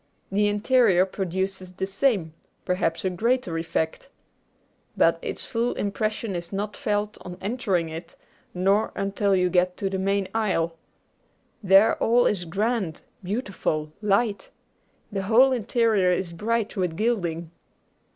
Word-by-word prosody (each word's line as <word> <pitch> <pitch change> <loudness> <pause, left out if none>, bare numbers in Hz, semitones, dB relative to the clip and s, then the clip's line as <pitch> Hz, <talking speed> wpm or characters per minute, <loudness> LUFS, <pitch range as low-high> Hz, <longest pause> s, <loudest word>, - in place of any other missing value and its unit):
The 205 +1 +2
interior 205 -3 +4
produces 190 0 -3
the 190 +1 -2
same, 195 - 0 0.3
perhaps 175 -2 0
a - - +3
greater, 230 -1 0
effect. 165 +7 -2 0.9
But - - +4
its - - -5
full 235 +1 -1
impression 215 0 -2
is 170 0 -5
not 205 +1 -3
felt 210 0 -2
on 180 0 -8
entering 195 -6 -1
it, 165 +2 -8 0.4
nor 195 +4 +1
until 200 0 +1
you 180 -1 +3
get 180 0 +1
to 195 -1 -2
the 190 - -2
main 195 0 0
aisle. 185 -7 0 0.9
There 195 +2 +5
all 240 +2 +4
is 185 -4 0
grand, 200 -1 -1 0.2
beautiful, 185 -7 -2
light. 210 +1 +1 0.6
The 195 -1 -2
whole 235 +7 +5
interior 225 -5 +2
is 180 -1 -1
bright 225 +4 -1
with 180 -5 -1
gilding. 175 -8 -1
195 Hz, 130 wpm, -25 LUFS, 180-215 Hz, 0.9 s, There